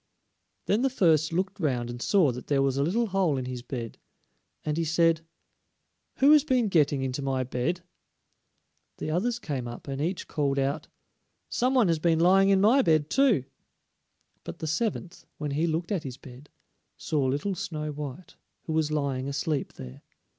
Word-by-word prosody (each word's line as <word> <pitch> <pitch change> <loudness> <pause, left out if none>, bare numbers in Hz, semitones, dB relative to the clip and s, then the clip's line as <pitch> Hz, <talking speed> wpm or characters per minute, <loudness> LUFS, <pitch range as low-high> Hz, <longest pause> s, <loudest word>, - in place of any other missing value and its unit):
Then 210 +4 +2
the 270 - +2
first 160 - +3
looked 190 +4 -2
round 125 -8 0
and 120 0 -7
saw 180 -6 +3
that 125 +1 -8
there 140 -2 +2
was 135 -1 +1
a 140 - 0
little 215 +10 +1
hole 190 -8 +1
in 130 - -3
his 125 -1 -5
bed, 120 -2 -6 0.7
and 150 -1 -1
he 165 - 0
said: 165 0 +2 0.9
"Who 275 +2 +5
has 305 -2 +7
been 250 -7 +1
getting 145 -6 +2
into 130 +1 -3
my 135 -1 -1
bed?" 130 +8 -2 1.2
The 155 - -4
others 230 +9 0
came 140 - -4
up 120 +4 -9
and 135 0 -4
each 175 +4 -2
called 140 -2 -1
out: 140 +3 -1 0.6
"Somebody 250 -5 +2
has 165 -2 +1
been 165 0 +2
lying 190 +3 +5
in 195 -1 +4
my 230 +8 +5
bed 155 - +2
too." 265 - +3 1.0
But - - -7
the - - -5
seventh, 185 +2 -3
when 150 -2 -3
he 155 +4 0
looked 165 +3 -2
at 190 -5 0
his 130 -3 -7
bed, 130 +2 -13 0.5
saw 150 -3 -1
little 145 +9 0
Snow 155 -4 -4
white, 150 +3 -8 0.3
who 160 - -4
was 155 -1 +1
lying 140 -3 -1
asleep 145 +1 -2
there. 65 +2 -10
155 Hz, 175 wpm, -27 LUFS, 135-190 Hz, 1.2 s, has